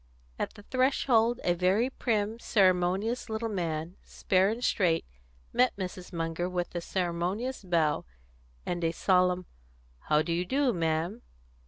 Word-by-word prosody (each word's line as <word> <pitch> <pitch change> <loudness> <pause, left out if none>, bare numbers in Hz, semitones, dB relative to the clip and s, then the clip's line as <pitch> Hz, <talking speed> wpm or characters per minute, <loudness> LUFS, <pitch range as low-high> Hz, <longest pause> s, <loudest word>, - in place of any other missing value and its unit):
At - - -3
the 205 - -13
threshold 245 -2 +2
a 175 - +3
very 190 +8 +2
prim, 220 -3 -1
ceremonious 195 +3 +2
little 220 +1 -2
man, 170 -3 -3
spare 190 +1 +1
and 230 +3 -3
straight, 170 -8 +2 0.5
met 250 0 +3
Mrs. 185 -1 -6
Munger 165 +1 -2
with 175 -1 -3
a 175 - -3
ceremonious 185 +8 -2
bow, 165 -5 +1 0.6
and 175 -1 -2
a 165 0 +1
solemn 180 0 +2 0.5
"How 150 0 +2
do 170 - -2
you 175 +1 0
do, 265 +5 +1
ma'am? 165 +6 -1
185 Hz, 140 wpm, -29 LUFS, 175-225 Hz, 0.6 s, a